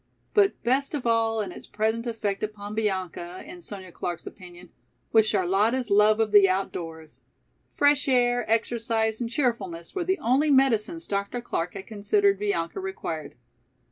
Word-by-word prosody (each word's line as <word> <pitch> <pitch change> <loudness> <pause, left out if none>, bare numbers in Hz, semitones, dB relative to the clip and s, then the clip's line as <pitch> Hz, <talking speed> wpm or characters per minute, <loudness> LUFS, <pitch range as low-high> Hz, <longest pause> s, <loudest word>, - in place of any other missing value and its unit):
But 405 -2 +3
best 275 +5 +1
of 275 - -4
all 225 -1 +2
in 195 -3 -4
its - - -11
present 220 +2 -1
effect 215 -4 -2
upon 210 -1 -5
Bianca, 185 -4 -3
in 350 +3 -10
Sonya 190 - -8
Clark's 175 0 -5
opinion, 180 -2 -12 0.4
was 220 -1 +5
Charlotta's 210 +5 +1
love 210 +2 +5
of 220 -2 +1
the 200 -2 +7
outdoors. 165 -4 -4 0.5
Fresh 285 0 +3
air, 245 -2 +3
exercise 225 0 0
and 235 - -2
cheerfulness 220 - -2
were 370 - -1
the 375 +2 0
only 270 +4 +2
medicines 270 +3 +2
Dr. 200 +4 -2
Clark 180 -7 -3
had 195 0 -7
considered 395 - +1
Bianca 410 -1 -1
required. 165 - -5
220 Hz, 150 wpm, -26 LUFS, 195-255 Hz, 0.5 s, the